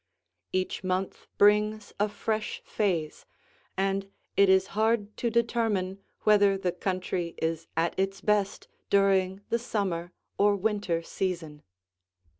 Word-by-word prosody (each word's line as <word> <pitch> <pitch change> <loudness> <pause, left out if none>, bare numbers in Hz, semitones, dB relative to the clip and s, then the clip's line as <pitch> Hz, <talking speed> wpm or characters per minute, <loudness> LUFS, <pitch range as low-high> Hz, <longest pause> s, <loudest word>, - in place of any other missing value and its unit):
Each 185 0 -1
month 185 +1 -2
brings 210 +1 +3
a 210 +1 +2
fresh 215 +1 -3
phase, 175 -8 -1 0.5
and 195 0 0 0.3
it 200 -1 +5
is 190 0 +5
hard 215 0 +1
to 235 - 0
determine 225 -5 0 0.2
whether 205 -2 +5
the 185 -2 -1
country 180 -2 -3
is 165 0 -2
at 165 +1 +2
its 195 +1 0
best 205 -1 0 0.2
during 195 -1 +3
the 235 - +1
summer 190 -7 -2 0.3
or 205 0 +5
winter 200 -4 -1
season. 165 -5 -3
195 Hz, 120 wpm, -28 LUFS, 185-210 Hz, 0.5 s, it